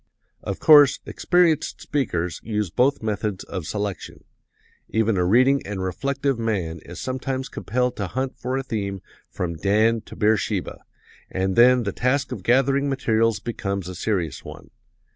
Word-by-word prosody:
"Of - - -5
course, 145 -3 +7
experienced 170 -4 +1
speakers 90 - -2
use 105 -5 -2
both 125 +4 +1
methods 105 -2 -2
of 95 -6 -6
selection. 100 -4 -5 0.7
Even 110 -1 +1
a 90 - +1
reading 130 +9 +4
and 100 -2 -4
reflective 135 +7 -1
man 95 -8 -2
is 90 0 -9
sometimes 130 +1 -3
compelled 125 +3 -2
to 100 - -2
hunt 130 +7 -3
for 130 +2 -3
a 135 - -2
theme 100 -6 -4 0.3
from 85 -3 -4
Dan 110 +6 +2
to - - -10
Beersheba, 105 0 0 0.5
and 95 0 -1
then 125 +1 +6
the 100 - -2
task 130 +6 0
of - - -5
gathering 135 +3 +2
materials 115 -5 +1
becomes 100 -4 -4
a 95 - -6
serious 90 -7 -2
one. - - -11
110 Hz, 150 wpm, -23 LUFS, 95-130 Hz, 0.7 s, course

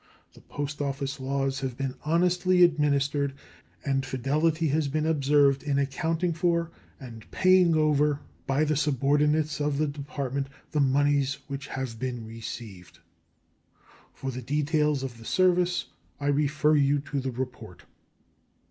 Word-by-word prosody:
The - - -17
post 145 0 -5
office 140 -1 -3
laws 135 0 -1
have 130 -3 -4
been 135 -2 -2
honestly 180 +3 +3
administered, 145 -3 +2 0.5
and 135 -1 +1
fidelity 150 +5 0
has 150 +1 +1
been 155 +2 -1
observed 145 -3 +3
in 145 -2 -1
accounting 160 +5 0
for 170 0 0 0.3
and 115 -5 -11
paying 185 -3 +4
over 150 -1 +2 0.3
by 135 +3 +2
the 155 0 +1
subordinates 150 +2 +1
of 145 -1 0
the 155 - +2
Department 140 -2 -4 0.2
the 150 - 0
moneys 140 0 +2
which 140 -1 -6
have 130 -4 -5
been 125 -2 -4
received. 110 -4 -9 1.1
For 135 - -5
the 130 0 -6
details 150 +1 0
of 120 -3 -6
the - - -12
service 180 +1 +2 0.3
I 145 0 -1
refer 150 +1 +2
you 145 0 +3
to 145 -1 -3
the 130 0 -3
report. 125 -6 -7
145 Hz, 140 wpm, -27 LUFS, 135-155 Hz, 1.1 s, paying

